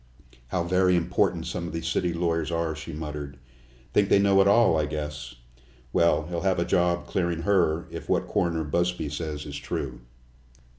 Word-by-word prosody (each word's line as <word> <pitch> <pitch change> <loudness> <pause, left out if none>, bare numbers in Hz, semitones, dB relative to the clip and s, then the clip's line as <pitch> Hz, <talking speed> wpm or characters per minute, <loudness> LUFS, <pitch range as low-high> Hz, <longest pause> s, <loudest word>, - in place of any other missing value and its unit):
"How 85 +7 -1
very 90 +1 +3
important 85 -1 +1
some 85 - -4
of - - -7
those 80 0 -3
city 90 +1 0
lawyers 85 -1 -1
are," 85 -2 -1
she 80 +2 -7
muttered. 75 -2 -6 0.6
"Think 100 -1 +3
they - - +6
know 100 -1 +5
it 95 - +4
all, 105 -3 +5
I 75 -1 +1
guess. 75 -5 -5 0.6
Well, 85 -2 +3
he'll 85 +1 -4
have 95 -1 +1
a 85 - +1
job 90 -1 +1
clearing 85 -3 -1
her, 85 -5 +2
if - - -8
what - - +1
Coroner 85 -5 0
Busby 85 +1 -1
says 75 0 -4
is 70 -1 -6
true." 65 -4 -5
85 Hz, 180 wpm, -26 LUFS, 75-90 Hz, 0.6 s, they